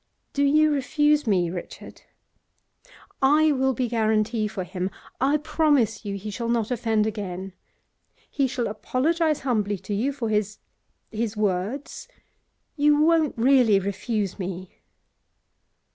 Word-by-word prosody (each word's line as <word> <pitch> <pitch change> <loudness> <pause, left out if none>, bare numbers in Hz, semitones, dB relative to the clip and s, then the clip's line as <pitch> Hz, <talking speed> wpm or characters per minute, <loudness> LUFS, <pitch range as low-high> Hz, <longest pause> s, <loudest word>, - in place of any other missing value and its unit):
'Do 285 - +1
you 305 +2 +4
refuse 295 0 +1
me, 180 -5 +2
Richard? 175 -1 -9 1.2
I 300 +3 +4
will 265 -1 +1
be 250 0 -1
guarantee 220 -1 0
for 200 -3 -5
him. 185 +1 -4 0.3
I 280 +3 +3
promise 290 -8 +1
you 200 -1 -3
he 210 +2 -6
shall 235 +2 -4
not 235 -1 0
offend 225 -3 +1
again. 195 -3 -5 0.8
He 275 -2 +1
shall 250 -2 -2
apologise 305 +9 0
humbly 210 -6 0
to 190 +3 -6
you 235 +8 0
for 255 -5 -4
his 210 -1 -1 0.5
his 225 -1 -3
words. 210 +7 -2 0.7
You 295 -1 +3
won't 315 -3 +3
really 240 -4 +4
refuse 200 +1 -3
me? 185 -1 -5
230 Hz, 130 wpm, -24 LUFS, 205-280 Hz, 1.2 s, you